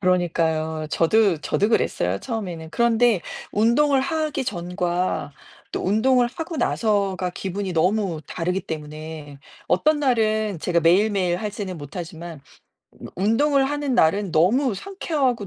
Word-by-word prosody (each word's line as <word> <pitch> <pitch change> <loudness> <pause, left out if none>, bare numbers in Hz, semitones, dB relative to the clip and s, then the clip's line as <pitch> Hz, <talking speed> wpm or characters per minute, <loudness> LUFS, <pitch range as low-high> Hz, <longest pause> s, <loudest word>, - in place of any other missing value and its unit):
그러니까요. 160 -4 0
저도 190 0 +3
저도 205 +6 0
그랬어요, 95 - 0
처음에는. 175 -8 -5
그런데 235 -3 +3 0.3
운동을 265 +6 +3
하기 300 -1 -1
전과 180 -4 -2 0.4
또 - - -2
운동을 240 +5 +3
하고 325 +5 -6
나서가 200 -7 0
기분이 190 +1 -4
너무 180 0 +1
다르기 180 +2 -2
때문에 155 -1 -7 0.3
어떤 300 +10 +2
날은 215 - +1
제가 170 -2 +1
매일매일 185 +1 +3
하지는 200 -2 -5
못하지만 165 +1 -8 0.8
운동을 270 +8 +2
하는 290 -3 -1
날은 195 0 +2
너무 220 - +3
상쾌하고 275 - -2
195 Hz, 300 characters per minute, -23 LUFS, 170-235 Hz, 0.8 s, 저도